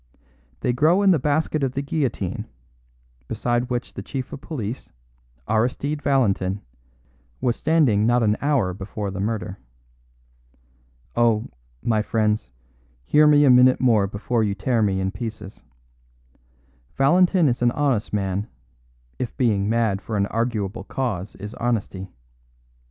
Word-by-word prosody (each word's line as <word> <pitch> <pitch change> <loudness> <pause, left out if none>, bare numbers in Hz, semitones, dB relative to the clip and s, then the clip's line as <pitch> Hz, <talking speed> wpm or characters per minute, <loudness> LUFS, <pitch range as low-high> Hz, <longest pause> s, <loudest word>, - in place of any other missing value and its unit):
They 125 - +1
grow 160 +10 +3
in 195 - +6
the 165 - +3
basket 150 +2 0
of 135 -2 0
the 140 - -2
guillotine, 135 - -2 0.8
beside 120 +2 -1
which 125 0 -3
the - - -6
chief 130 -3 -6
of 135 - -7
police, 125 -7 -6 0.6
Aristide 125 +7 0
Valentin, 100 -9 +1 0.8
was 120 -2 +1
standing 130 -10 +2
not 120 0 +3
an 105 -1 +3
hour 140 -11 +1
before 100 +2 -5
the 95 - -6
murder. 105 -2 -3 1.6
Oh, 115 -2 +2 0.3
my 110 -2 +2
friends, 105 - 0 0.6
hear 150 - +5
me 145 -1 +6
a 135 - +6
minute 125 +1 +6
more 110 -6 +3
before 110 +4 -1
you 100 -2 -1
tear 115 +3 0
me 100 -3 +1
in 95 0 -1
pieces. 110 -2 -7 1.4
Valentin 175 +4 +4
is 120 -2 0
an 120 - +4
honest 130 -4 0
man, 100 0 -1 0.7
if 125 - -4
being 105 -5 +1
mad 110 -4 +1
for 110 0 -4
an 100 - +2
arguable 115 -2 -2
cause 105 -7 -3
is 105 +2 -8
honesty. 100 -5 -2
115 Hz, 135 wpm, -23 LUFS, 105-135 Hz, 1.6 s, in